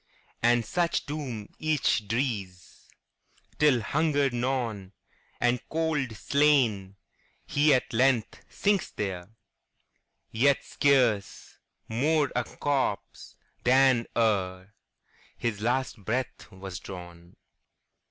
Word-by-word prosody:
And 120 0 +3
such 175 +4 0
doom 130 -8 -6
each 150 -8 +1
drees, 105 - -4 0.7
Till, 145 -6 +4
hunger 145 +2 +1
gnawn, 120 -6 -2 0.5
And 120 0 +1
cold 155 -7 -1
slain, 120 -8 +2 0.5
he 150 +1 +3
at 130 -2 +1
length 125 -1 +1
sinks 205 -2 0
there, 95 -3 -5 1.0
Yet 135 +5 +2
scarce 125 -8 +1 0.3
more 145 +5 +1
a 125 - +1
corpse 135 -8 -3 0.3
than 130 -1 +4
ereHis 100 +1 -3
last 125 -1 -1
breath 120 +6 -3
was 95 -2 -8
drawn. 85 -2 -11
120 Hz, 90 wpm, -27 LUFS, 105-140 Hz, 1.0 s, Till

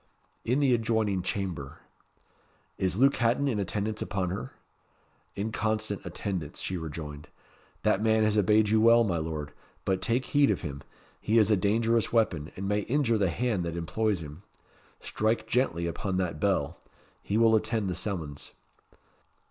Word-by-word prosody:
"In 130 +5 +1
the 135 -3 +4
adjoining 110 -4 +1
chamber." 90 -7 -4 1.0
"Is 95 0 0
Luke 135 +3 +4
Hatton 120 +5 +2
in 115 -6 0
attendance 105 +2 -2
upon 95 -3 -2
her?" 95 - -5 0.8
"In 105 +3 -3
constant 110 -2 -2
attendance," 90 -3 -4
she 95 - -3
rejoined. 75 -3 -6 0.6
"That 95 - +2
man 110 0 +3
has 110 -1 +2
obeyed 105 +1 +4
you 110 0 +3
well, 115 +1 +6
my 90 -6 0
Lord. 75 -2 -4 0.3
But 95 -1 0
take 120 +3 +1
heed 145 -1 +3
of - - 0
him: 70 -1 -6 0.4
he 110 +2 +1
is 110 -1 +5
a - - +6
dangerous 115 +4 +1
weapon, 90 -9 +1
and 95 +1 -4
may 105 +1 +1
injure 115 0 +1
the 95 -3 +2
hand 110 0 -1
that 85 0 -4
employs 95 +3 -1
him. 75 +3 -10 0.6
Strike 110 0 -1
gently 110 -8 0
upon 90 +2 -2
that 90 -5 -2
bell. 90 -7 0 0.4
He 105 - -1
will 115 -1 +5
attend 110 -1 0
the 90 - -1
summons." 80 -8 -5
105 Hz, 160 wpm, -28 LUFS, 90-110 Hz, 1.0 s, well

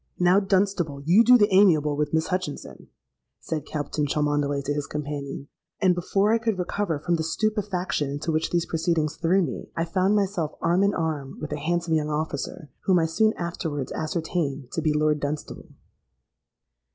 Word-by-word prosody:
—'Now, 180 +2 +4
Dunstable, 190 -7 0
you 185 +8 +6
do 250 +2 +7
the 205 -3 +3
amiable 160 -7 +5
with 150 0 -1
Miss 160 0 0
Hutchinson,' 185 -5 -4 0.5
said 155 -2 -4
Captain 150 0 -2
Cholmondeley 145 -1 0
to 145 - -1
his 145 0 -3
companion; 145 -1 -5 0.3
and 185 -3 +4
before 195 +4 +1
I 230 - +3
could 225 -3 -1
recover 180 -2 -1
from 170 +3 0
the 160 - -2
stupefaction 190 -4 -1
into 145 +4 -3
which 160 +1 0
these 170 -1 0
proceedings 160 -2 0
threw 180 +3 +2
me, 145 - -5
I 165 - +1
found 185 +4 +1
myself 190 -6 0
arm 175 +3 +2
in 200 0 +2
arm 150 -5 -3
with 155 - -6
a - - -3
handsome 170 +2 -1
young 155 -1 +1
officer, 150 0 -4
whom 185 -2 +4
I 165 - +3
soon 215 +7 +2
afterwards 160 -5 -4
ascertained 155 -5 -3
to 165 - -2
be 155 -1 +1
Lord 150 0 +2
Dunstable. 145 +1 -5
165 Hz, 175 wpm, -25 LUFS, 150-185 Hz, 0.5 s, do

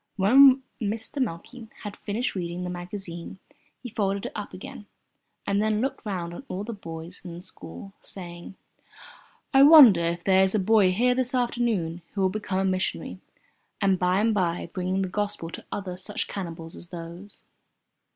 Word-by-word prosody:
When 260 +7 +7 0.2
Mr. 220 +6 -2
Meikle 230 +3 -4 0.2
had 205 -1 -6
finished 220 +5 -2
reading 175 -1 -4
the 180 - -3
magazine 175 -1 -7 0.5
he 245 - -5
folded 200 -3 -1
it - - -4
up 210 -1 -6
again 190 +2 -9 0.6
and 200 +1 +1
then 215 0 +1
looked 265 +4 -2
round 175 -4 -3
on 220 - -8
all 190 +2 -4
the 230 +2 -5
boys 165 -3 -8
in 175 -2 -7
the 175 - -9
school, 185 - -9
saying: 175 0 -8 1.0
"I 270 - +7
wonder 275 - +9
if 170 0 -2
there 190 -1 +4
is 190 +2 +3
a - - +3
boy 195 -1 +4
here 245 +6 +3
this 255 0 -1
afternoon 230 -9 0
who 200 - 0
will 190 - +3
become 200 -1 -3
a 190 - +1
missionary, 185 0 -2 0.6
and 195 -2 +2
by 180 +1 +2
and 220 +1 +2
by 175 -4 -1
bring 185 +1 -1
the - - -1
Gospel 195 -3 -3
to - - -9
other 190 -3 -4
such 185 - -4
cannibals 165 -4 -6
as 175 - -11
those?" 175 +3 -9
195 Hz, 175 wpm, -26 LUFS, 175-215 Hz, 1.0 s, wonder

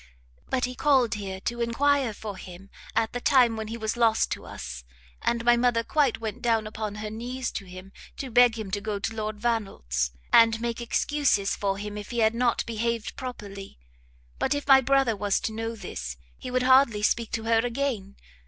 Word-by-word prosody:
but 255 -1 +1
he 250 - -5
called 255 -4 +3
here 195 -3 -5
to 240 +4 -3
enquire 265 +2 +2
for 210 -1 -7
him 190 +1 -11 0.2
at 225 -1 +1
the 245 - -3
time 250 -5 +4
when 220 -1 -4
he 225 +2 -5
was 220 0 -2
lost 230 -2 +2
to - - -4
us, 60 0 -7 0.4
and 235 0 0
my 240 0 +6
mother 240 -1 +2
quite 280 -1 +1
went 220 -2 -5
down 225 -2 +1
upon 215 -1 -5
her 210 0 -5
knees 245 +3 -4
to 195 - -5
him 185 +1 -11 0.3
to 265 -2 -5
beg 245 -1 +5
him 210 -4 -5
to 205 +1 -2
go 210 -1 -2
to 215 +3 -3
Lord 215 -1 -4
Vannelt's, 195 - -1 0.2
and 225 -1 +6
make 235 0 -3
excuses 235 -4 +1
for 195 -1 -1
him, 210 +1 -5
if 205 - -9
he 240 - -5
had 220 -1 +3
not 240 0 +1
behaved 230 0 -2
properly: 200 -6 -8 0.6
but 265 - +1
if 285 - -3
my 270 -1 +8
brother 270 -3 +2
was 205 0 0
to 220 - -3
know 225 +1 -3
this, 60 - -6 0.2
he - - -8
would 255 0 +1
hardly 255 -5 +5
speak 230 +1 +1
to 225 - -2
her 225 0 +3
again! 235 -5 -2
225 Hz, 200 wpm, -26 LUFS, 210-245 Hz, 0.6 s, my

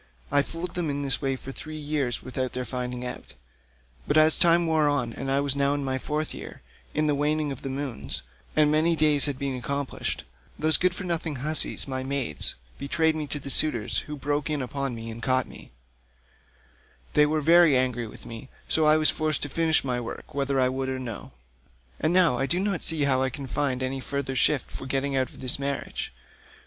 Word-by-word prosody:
I 145 - +4
fooled 165 +4 -6
them 175 -3 -2
in 140 0 -2
this 135 -1 +1
way 135 -1 0
for 135 +1 -8
three 155 +3 -7
years 145 -5 -1
without 130 0 -3
their 125 0 -3
finding 125 -1 -4
it 125 - -3
out, - - -15 0.7
but - - +2
as 155 0 +5
time 170 0 +4
wore 155 -2 +3
on 125 -5 0
and 135 +3 -5
I 135 - +2
was 140 -1 +2
now 140 0 +2
in 145 - -2
my 130 0 -1
fourth 150 +3 -2
year, - - -9 0.3
in 155 - +2
the 150 - +2
waning 150 +1 0
of 135 - -7
moons, 135 - -2 0.3
and 150 -1 +4
many 160 +2 +3
days 150 -3 +4
had 140 -2 -2
been 135 -1 -2
accomplished, 140 +2 -2 0.3
those 155 -2 +4
good 180 -1 +1
for 195 - -5
nothing 165 -3 -2
hussies 150 +3 +1
my 130 -1 -3
maids 130 - +1 0.2
betrayed 155 +3 +1
me 155 -1 -3
to 145 - -4
the 140 0 -5
suitors, 150 -9 +3
who 150 - -7
broke 145 +1 -1
in 150 -3 -1
upon 135 0 -3
me 115 0 -6
and 115 +1 -8
caught 130 0 +2
me; - - -12 1.4
they 150 0 +5
were 155 +1 +1
very 165 -2 +6
angry 125 -2 0
with 105 - -12
me, 115 +3 -9 0.2
so 160 - +2
I 155 0 +6
was 155 0 +3
forced 155 -2 0
to 145 - -3
finish 160 +2 +2
my 125 -2 -1
work 115 - -8
whether 140 -1 0
I 130 - +4
would 130 +1 -2
or 130 - -2
no. 120 -5 -7 0.7
And 155 - +1
now 175 -9 +5
I 135 - 0
do 175 - 0
not 195 -2 -1
see 160 -2 +1
how 130 -2 +2
I 130 - +1
can 140 +2 -7
find 130 -1 -1
any 130 +1 -2
further 135 0 -3
shift 130 +2 +2
for 130 - -7
getting 135 +1 -1
out 130 -1 +1
of - - -13
this 130 +1 +4
marriage. 140 0 -3
140 Hz, 215 wpm, -26 LUFS, 130-155 Hz, 1.4 s, very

